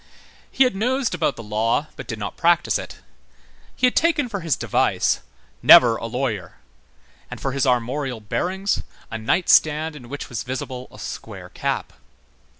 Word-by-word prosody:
He 270 - +4
had 250 -5 +1
nosed 250 +4 0
about 165 -3 0
the 115 - -9
law, 110 +6 0
but - - -9
did 115 - -4
not 100 -1 -5
practise 170 0 +2
it. - - -9 0.7
He - - +2
had 250 - +2
taken 300 -5 +2
for 200 -3 -3
his 165 -6 0
device: - - +1 0.4
"Never 120 -2 +8
a 115 - -5
lawyer," 115 -7 -3 0.7
and - - -8
for 135 - -2
his 135 0 0
armorial 125 +1 0
bearings 185 - -1 0.3
a 110 - -4
nightstand 155 +4 +3
in 125 -5 -11
which 145 +2 -6
was 120 -2 -4
visible 130 0 -5
a - - -14
square - - -8
cap. - - -3
135 Hz, 160 wpm, -22 LUFS, 115-180 Hz, 0.7 s, Never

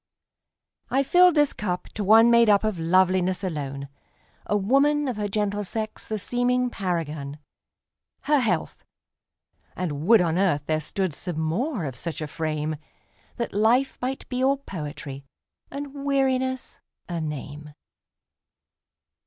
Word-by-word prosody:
I 270 +1 +2
filled 360 +4 +5
this 295 -2 +3
cup 180 -3 -3
to 210 - -4
one 225 +4 +6
made 235 -1 +6
up 205 0 +5
of 215 -5 -1
loveliness 185 +2 +2
alone,A 140 +4 -5
woman, 280 +8 +2
of 250 - -2
her 210 -1 -1
gentle 205 0 -1
sex 215 +2 -5
the 215 - -2
seeming 245 +3 0
paragon—Her 160 - -4
health! 195 -10 -1 0.9
and 160 -3 -3
would 230 0 +7
on 170 0 +1
earth 175 -7 +2
there 155 0 0
stood 185 +2 -2
some 175 +1 -5
more 185 - -1
of 135 -3 -5
such 160 +6 -5
a 155 - -3
frame, 155 0 -3 0.6
That 235 - -3
life 230 +6 +2
might 260 +2 -3
be 255 0 -2
all 275 +1 +3
poetry, 150 - -7 0.5
and 280 0 -6
weariness 260 -2 0 0.3
a 170 -2 -3
name. 150 0 -6
195 Hz, 130 wpm, -25 LUFS, 155-250 Hz, 0.9 s, would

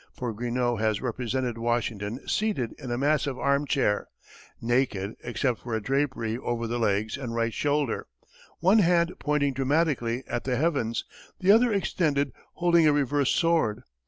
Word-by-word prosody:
For 120 -2 -3
Greenough 120 +1 -1
has 110 -2 +1
represented 125 -1 -2
Washington 115 -1 -2
seated 205 - -1
in 135 -4 -7
a 120 - -1
massive 140 -1 +1
armchair, 140 -6 +1 0.5
naked 115 -4 0
except 120 0 -1
for 120 -2 -4
a - - 0
drapery 130 -2 -1
over 120 -2 -2
the 120 +1 -2
legs 110 +2 0
and 120 -4 -5
right 115 -1 0
shoulder, 145 -2 0 0.5
one 190 +6 +5
hand 170 -2 +3
pointing 145 -2 +1
dramatically 135 -3 0
at 120 - -3
the 130 -1 -1
heavens, 135 -7 0 0.3
the 190 +1 +4
other 230 +2 +5
extended 150 - 0 0.2
holding 170 -2 +4
a - - +6
reversed 145 -1 +1
sword. 165 -11 +1
130 Hz, 150 wpm, -27 LUFS, 115-150 Hz, 0.5 s, a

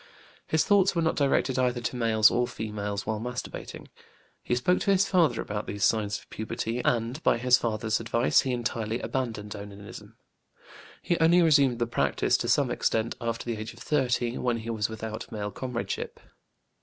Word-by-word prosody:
His 160 - +2
thoughts 195 -2 +4
were 170 - +2
not 160 - +1
directed 135 -2 +1
either 125 -1 +1
to 120 +1 -3
males 110 -3 +4
or 120 0 +1
females 105 -3 -4
while 110 -1 -2
masturbating. 120 +2 -6 0.5
He 125 - -1
spoke 155 +9 +2
to - - -1
his 195 0 +3
father 175 -6 +3
about 105 0 -4
these 100 -1 -4
signs 105 -2 +1
of - - -16
puberty, 115 +2 -3
and 120 +5 0
by - - +3
his 125 +1 +4
father's 110 -1 -1
advice 115 +1 +2
he 130 - -2
entirely 115 -2 -2
abandoned 110 -5 -3
onanism; 100 0 -10 0.9
he 175 - 0
only 170 +2 +5
resumed 140 -6 +4
the 120 - 0
practice, 120 - +1
to - - -3
some - - +2
extent, 110 +1 0
after 115 -1 -3
the 120 -2 -3
age 110 +2 -6
of - - -15
30, 125 -4 0
when 120 -2 0
he 115 +1 -5
was 110 -1 -1
without 110 0 -6
male 105 -1 -4
comradeship. 125 -1 -4
115 Hz, 180 wpm, -27 LUFS, 110-130 Hz, 0.9 s, only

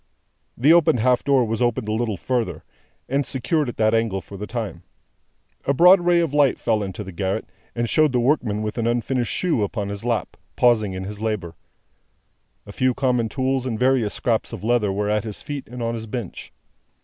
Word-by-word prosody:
The 145 +7 +5
opened 160 -7 +4
half 125 +1 +2
door 135 -3 +3
was 110 +1 -3
opened 120 -3 0
a - - -1
little 110 -3 -1
further, 100 -9 -2 0.4
and 140 +2 +1
secured 140 +3 -1
at - - -8
that 110 0 +2
angle 115 -4 +1
for 100 - -12
the 105 +2 -6
time. 110 -8 -5 0.8
A 140 - +1
broad 180 +5 +7
ray 175 0 +3
of 165 -4 -1
light 145 -3 +3
fell 110 -2 0
into 100 +1 -5
the 95 - -8
garret, 95 +3 -2 0.3
and 120 0 -1
showed 155 +4 +3
the 125 - +1
workman 120 -5 +1
with 110 +2 -3
an 115 - 0
unfinished 120 0 0
shoe 170 -11 0
upon 100 0 -2
his 100 +1 -5
lap, 115 -2 -2 0.2
pausing 110 -5 +3
in 95 0 -5
his 105 +2 -7
labour. 105 -7 -2 1.1
His 100 - -10
few 130 +1 +1
common 125 -4 +1
tools 130 0 -1
and 115 -3 -2
various 125 -3 +2
scraps 115 -2 -1
of 115 -5 -7
leather 115 -3 +2
were 105 +1 -1
at 105 -1 +1
his 110 -3 -5
feet 145 -2 -6
and 120 0 -6
on 115 0 -1
his 115 -1 -6
bench. 110 -4 -6
115 Hz, 205 wpm, -22 LUFS, 105-130 Hz, 1.1 s, broad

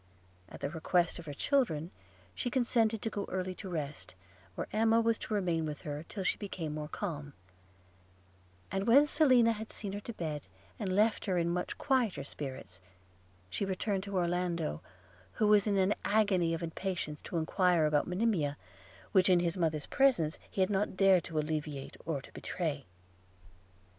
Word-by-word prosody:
At - - -11
the 140 - -1
request 170 +1 +1
of 165 - -10
her 145 - -4
children 180 - +1 0.4
she 245 - -2
consented 230 -3 +1
to 225 - -1
go 200 - -3
early 185 0 -2
to 190 +1 -8
rest, 150 - -5 0.4
where - - -3
Emma 225 +1 +4
was 230 -1 +2
to - - -5
remain 175 -5 +1
with 150 -2 -6
her 150 +2 -5
till 195 - -4
she - - 0
became 175 -7 -4
more 150 0 -4
calm; 150 -6 -5 1.4
and 195 +2 -1
when 275 +5 +7
Selina 255 -6 +5
had 220 0 -5
seen 200 -2 -4
her 205 - -3
to 235 +3 -7
bed, 155 -6 -3 0.4
and 190 -3 -1
left 215 +2 +3
her 185 -4 +1
in 170 0 +1
much 180 +1 -2
quieter 240 - +1
spirits, 130 -11 -7 0.7
she 95 - -3
returned 195 +1 -1
to 200 0 -4
Orlando, 175 -2 -1 0.5
who 220 - +1
was 210 0 +5
in 200 -1 +2
an 190 +2 +3
agony 190 -6 +2
of 165 - -6
impatience 170 -3 -3
to 170 - -4
enquire 175 0 +3
about 150 -1 +2
Monimia, 180 -7 0 0.5
which 185 -1 +5
in 180 -1 +6
his 170 -1 0
mother's 160 -5 0
presence 235 - +2
he 195 - -2
had 185 - +2
not 195 -1 0
dared 190 -2 +5
to 165 - -5
alleviate 150 -2 -3
or 145 -5 -2
to - - -14
betray. 155 -6 -3
180 Hz, 175 wpm, -32 LUFS, 155-210 Hz, 1.4 s, when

